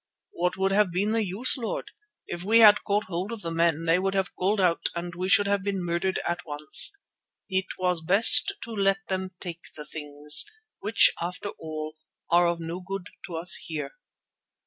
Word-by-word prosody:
"What 180 +1 -3
would 190 0 0
have 200 -2 +1
been 200 +5 -1
the 225 0 0
use, 205 +9 +1
Lord? 230 - -5 0.3
If 175 - -7
we 220 +4 +3
had 210 -2 +6
caught 205 +1 -1
hold 185 +3 -5
of 230 -3 -8
the 165 - -5
men, 165 -1 0
they 165 +2 +2
would 195 +1 -2
have 190 -1 -2
called 200 +3 -1
out 180 -3 0
and 175 0 -6
we 180 +2 -5
should 205 +2 +4
have 200 0 -1
been 195 -2 -4
murdered 175 +2 -2
at 175 0 -3
once. 150 - +3 0.5
It 190 0 -1
was 180 -2 -2
best 195 +7 +7
to 230 - -9
let 195 -2 -1
them 185 -1 -4
take 170 -2 -8
the 150 - -9
things, 150 0 +2 0.4
which 210 +3 +3
after 180 +4 -5
all 155 -2 -8 0.3
are 175 +1 +4
of 170 0 -2
no 165 +2 -6
good 190 0 -8 0.2
to 170 - -8
us 170 +2 +1
here." 150 -4 -6
180 Hz, 190 wpm, -25 LUFS, 170-195 Hz, 0.5 s, best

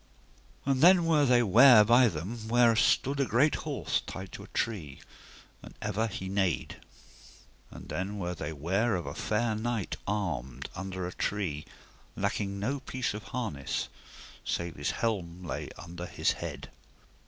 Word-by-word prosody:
And 135 -1 +1
then 175 +1 +7
were 155 -3 +4
they 120 -1 +5
ware 115 +2 +8
by 120 +3 +6
them 110 +6 -5
where 120 0 +5
stood 135 +4 +2
a 140 - +3
great 130 +6 +3 0.2
horse - - -1
tied 95 0 -7
to - - -8
a - - -11
tree, 90 -12 -3 0.6
and - - -12
ever 105 +2 -1
he 95 -2 -5
neighed. 95 -3 -1 0.9
And - - -11
then 100 +3 -3
were 90 -2 -3
they 80 -2 -5
ware 95 +10 0
of 85 - -3
a - - -5
fair 110 +1 0
knight 110 -2 -2
armed, 70 -11 -3
under 95 -1 -5
a 90 - -5
tree, 85 -8 -2 0.5
lacking 100 -1 -2
no 130 +8 -1
piece 130 -3 -3
of 105 0 -7
harness, 110 - -3 0.5
save 85 -1 -2
his 70 -1 -2
helm 90 -6 -2
lay 85 - -4
under 85 +1 -7
his - - +1
head. - - -6
105 Hz, 155 wpm, -29 LUFS, 90-120 Hz, 0.9 s, ware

